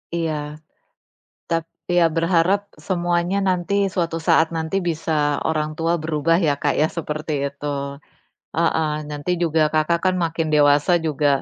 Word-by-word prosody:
Iya. 165 -2 -1 1.2
Tap 165 -1 0 0.3
ya, 175 - +5
berharap 170 +4 +3 0.3
semuanya 175 +1 0
nanti, 180 +2 0 0.2
suatu 165 -2 -1
saat 160 - +5
nanti 160 +4 -2
bisa 160 0 -2 0.4
orang 155 -1 0
tua 165 +1 0
berubah, 160 +1 +1
ya, 145 - +3
Kak, 145 - +2
ya, 155 - +4
seperti 155 0 -4 0.2
itu. 140 +1 -9 0.9
Heeh, 160 -1 +2 0.2
nanti 145 +4 -4
juga 160 -1 +1
Kakak 155 +2 +2
kan 185 0 +3
makin 165 0 -1
dewasa 145 +3 +4
juga, 150 -1 +1
165 Hz, 135 wpm, -21 LUFS, 155-170 Hz, 1.2 s, ya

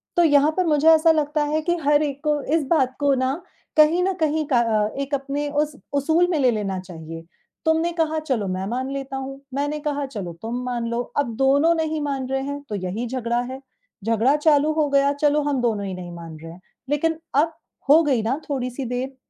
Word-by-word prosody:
तो 345 - +5
यहाँ 290 -1 +5
पर 370 - +2
मुझे 305 -1 +2
ऐसा 325 0 +6
लगता 300 -1 +1
है 305 +2 0
कि 345 +2 0
हर 295 +1 +4
एक 280 -2 -3
को 295 -1 +1
इस 320 - +1
बात 260 -6 +2
को 285 -1 +3
ना 260 +1 0 0.4
कहीं 315 +4 +5
न 380 +1 +1
कहीं 310 -1 +1
अ, 230 -5 +2
एक 280 +1 -4
अपने 280 +1 -3
उस 295 0 -1 0.2
उसूल 320 +5 +3
में 315 - +1
ले 255 -3 +4
लेना 195 -4 -2
चाहिए। 165 -2 -9 0.4
तुमने 320 +1 +2
कहा 315 -2 0
चलो 260 -10 -2
मैं 185 +1 -2
मान 255 +3 -2
लेता 270 -1 -4
हूँ, 270 +1 -6
मैंने 290 +2 -1
कहा 290 -1 -2
चलो 200 -10 -6
तुम 235 +3 -3
मान 240 -2 -2
लो, 235 +1 -1 0.2
अब 265 -5 0
दोनों 280 +6 +4
नहीं 315 -1 -1
मान 275 -3 -2
रहे 270 0 0
हैं 285 +1 -4
तो 210 - -3
यही 200 +5 -3
झगड़ा 240 -1 -1
है, 260 - -6 0.4
झगड़ा 230 +5 +2
चालू 300 0 +3
हो 305 -2 +1
गया 280 0 +3
चलो 295 +1 +2
हम 285 -2 0
दोनों 215 -4 0
ही 190 - -4
नहीं 180 -1 -7
मान 165 -2 -9
रहे 165 - -8
हैं, 175 +2 -14 0.3
लेकिन 320 +2 +1 0.2
अब 310 +4 +3 0.4
हो 310 +3 +8
गई 270 -7 +1
ना 260 +6 -1
थोड़ी-सी 255 -1 -3
देर, 250 +2 -3
280 Hz, 215 wpm, -23 LUFS, 240-300 Hz, 0.4 s, हो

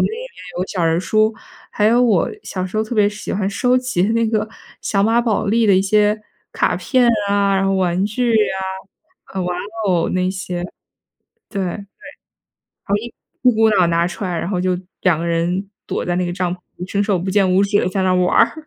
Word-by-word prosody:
里 - - +3
面 485 +3 -6 0.3
有 185 - -1
小 180 -4 -2
人 165 0 +2
儿 - - 0
书， 215 +3 +2 0.4
还 210 - +1
有 235 +3 +4
我 220 -7 +2
小 185 -1 -4
时 185 - -6
候 220 - +1
特 230 - -5
别 210 -2 +4
喜 205 0 -6
欢 195 -1 0
收 245 +5 +2
集 250 -8 -1
那 230 0 +2
个 215 -1 0 0.4
小 195 -2 +1
马 225 +3 +3
宝 225 -3 0
莉 225 +2 +2
的 200 - +5
一 185 - +4
些 210 +1 +2 0.3
卡 - - +1
片 255 -3 +2 0.2
啊， 200 -1 +2
然 195 - +1
后 195 - +1
玩 185 0 +1
具 240 +3 0
呀， 215 -3 +2 0.8
呃， 190 - -1
玩 180 0 -2 0.3
偶 175 -3 +2
那 185 0 0
些， 185 -2 -4 0.9
对， 195 -3 -2
好 - - -7 1.6
一 255 - +5
一 - - -3
股 220 0 +4
脑 190 -4 +4
拿 170 0 +2
出 200 - -5
来， 180 -3 -2
然 - - -3
后 180 -3 0
就 180 0 +1 0.3
2 175 -4 +3
个 170 - -3
人 175 +4 -1 0.2
躲 - - -2
在 175 0 -1
那 180 0 0
个 175 - -3
帐 180 -2 -1
篷 - - -16 0.2
里 180 - -6
伸 200 +2 0
手 200 -3 +1
不 190 +2 -3
见 195 -1 +3
五 195 - +4
指 205 +1 +2
地 - - 0
在 190 +1 -1
那 185 - +2
儿 - - +3
玩 180 0 +2
儿。 315 -1 +2
195 Hz, 240 characters per minute, -19 LUFS, 180-215 Hz, 1.6 s, 的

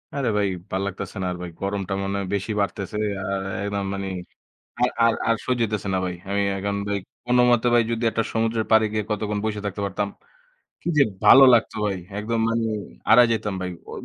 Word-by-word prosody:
আরে 135 -4 0
ভাই, 100 -1 +2 0.2
ভাল্লাগতাছে 95 0 -3
না, - - -1
আর 90 - -5
ভাই 90 - -5
গরমটা 100 -1 -2
মনে 100 +1 -2
হয় 95 - -3
বেশি 100 +3 -3
বাড়তেছে। 100 +1 -3 0.3
আর 100 0 -2 0.2
একদম 100 -1 -2
মানি 100 0 -4 0.7
আর 125 - +3
আর 115 - +4
আর 115 - +3
সহ্য 125 -1 0
হইতেছে 105 -2 -2
না - - +2
ভাই। 90 - -2 0.2
আমি 100 0 +1 0.2
এখন 100 +1 -2
ভাই 100 - 0 0.3
কোনমতে 125 -1 +4
ভাই 120 - +6
যদি 115 0 -1
একটা 115 - 0
সমুদ্রের 115 0 0
পাড়ে 110 0 +6
গিয়ে 110 0 0
কতক্ষণ 105 0 -1
বসে 105 -1 -2
থাকতে 100 0 -4
পারতাম, 100 +1 -2 0.7
কি - - -7
যে 140 - +7 0.2
ভালো 135 - +9
লাগতো 115 - +3
ভাই, 100 -2 -1 0.2
একদম 115 +2 -1
মানে 115 0 0 0.4
হারায় 120 +2 +7
যাইতাম 110 -3 -1
ভাই। 90 - -2 0.2
ঐ - - -8
105 Hz, 195 wpm, -23 LUFS, 100-115 Hz, 0.7 s, ভালো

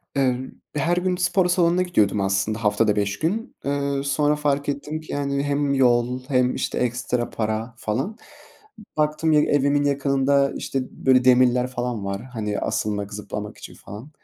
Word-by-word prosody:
Eee, 130 -3 +2 0.4
her 170 +5 +1
gün 180 0 +1
spor 180 0 +2
salonuna 175 0 +3
gidiyordum 105 - +2
aslında 100 +3 0
haftada 105 0 +2
beş 100 0 -1
gün. 215 - -2
Iıı, 140 0 -1
sonra 145 +1 +2
fark 145 -1 0
ettim 150 +2 -4
ki, 155 - -10
yani, 140 -1 -1
hem 145 0 0
yol 125 -1 +2
hem, 125 -2 +2
işte, - - -2
ekstra 125 0 -1
para 110 +2 -3
falan. 130 - -3 0.8
Baktım 155 +1 +1
ya 150 - +5
evimin 145 0 +2
yakınında, 140 0 +2
işte, 135 - -2
böyle 130 -1 +2
demirler 125 0 +4
falan 120 -5 -3
var. 100 +3 -3
Hani, 110 -5 -4
asılmak, 105 -1 -2
zıplamak 105 0 -6
için - - -10
falan. 110 +8 -10
135 Hz, 155 wpm, -23 LUFS, 115-145 Hz, 0.8 s, ya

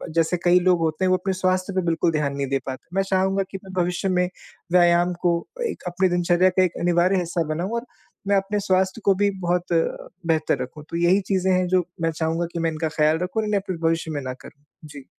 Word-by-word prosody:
जैसे 165 +2 +2
कई 175 0 +5
लोग 180 -1 +3
होते 160 +3 0
हैं - - +2
वो 185 - +4
अपने 190 +1 -2
स्वास्थ्य 185 +1 0
पे 185 - +2
बिल्कुल 165 0 +1
ध्यान 150 -3 -1
नहीं 140 -1 -2
दे 135 - +1
पाते, 130 +3 -7
मैं 195 - +2
चाहूँगा 190 0 +1
कि 195 - -4
मैं 190 - -10
भविष्य 180 +2 -2
में 180 -1 +2 0.4
व्यायाम 175 0 +4
को 170 -1 +2 0.3
एक - - -7
अपनी 180 +1 +1
दिनचर्या 175 +1 +3
का 185 0 +2
एक 180 -2 -1
अनिवार्य 175 +2 +3
हिस्सा 170 -1 -1
बनाऊँ 175 +6 -3
और 240 - -13 0.4
मैं 200 - +3
अपने 195 +2 -1
स्वास्थ्य 190 +2 0
को 200 - +5
भी 205 +1 +2
बहुत 175 0 0 0.5
बेहतर 155 -4 +1
रखूँ। 140 +4 -10
तो 170 - -3
यही 175 +4 +3
चीज़ें 190 0 +2
हैं 180 0 +2
जो 185 0 +2 0.2
मैं 165 - +1
चाहूँगा 160 +2 -1
कि 170 - -3
मैं 165 0 0
इनका 155 0 -2
ख़याल 155 +1 +3
रखूँ 200 +5 -1
और - - -3
इन्हें 210 -1 +1
अपने 185 -3 -5
भविष्य 165 0 -1
में 145 -2 -3
ना 130 -1 -4
करूँ, 140 +2 -15 0.2
जी। 145 -3 -11
175 Hz, 235 wpm, -23 LUFS, 165-185 Hz, 0.5 s, कई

